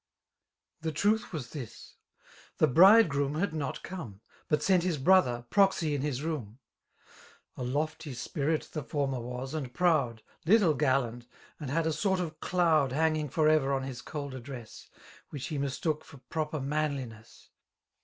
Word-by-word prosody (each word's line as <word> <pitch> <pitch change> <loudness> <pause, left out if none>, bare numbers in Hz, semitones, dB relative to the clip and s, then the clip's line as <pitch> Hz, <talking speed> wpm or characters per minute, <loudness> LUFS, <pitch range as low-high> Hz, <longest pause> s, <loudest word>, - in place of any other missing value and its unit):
The 160 0 -2
truth 210 +9 +1
was 140 -9 -6
this: 130 -7 -9 0.3
— - - -24
^The - - +3
bridegroom 165 - +6
had 175 +2 -1
not 150 -4 -4
come. 120 - -7 0.3
But 150 -1 +1
Bent 185 -2 +4
his 175 -3 0
bn>ther> 130 -6 +3
proxy 190 -6 +3
in 145 - -1
his 140 -1 -2
loom. 130 -9 -4 1.0
A - - -8
lofty 145 +2 -2
spiiit 150 +5 -2
the 155 - -3
Ibrmer 135 -3 -2
was, 125 +3 -6
and 140 -6 -4
proud^ 140 -9 +1 0.2
Little 185 -2 +5
gallant^ 125 -4 0 0.3
and 145 -4 -5
had 160 +4 0
a 160 - +1
sort 190 +4 0
of 160 -3 -4
doud 160 -8 +2
Han^ng 155 0 +1
for 155 -2 +2
ever 155 -3 +3
on 135 -1 0
his 130 -2 -6
cold 140 -1 -6
address^ 125 -3 -9 0.2
' - - -22
Which 145 +1 -6
be 150 -3 -3
mistook 145 +3 -1
for 140 - -14
proper 155 -1 -2
manliness. 135 -6 -4
150 Hz, 160 wpm, -30 LUFS, 130-160 Hz, 1.0 s, bridegroom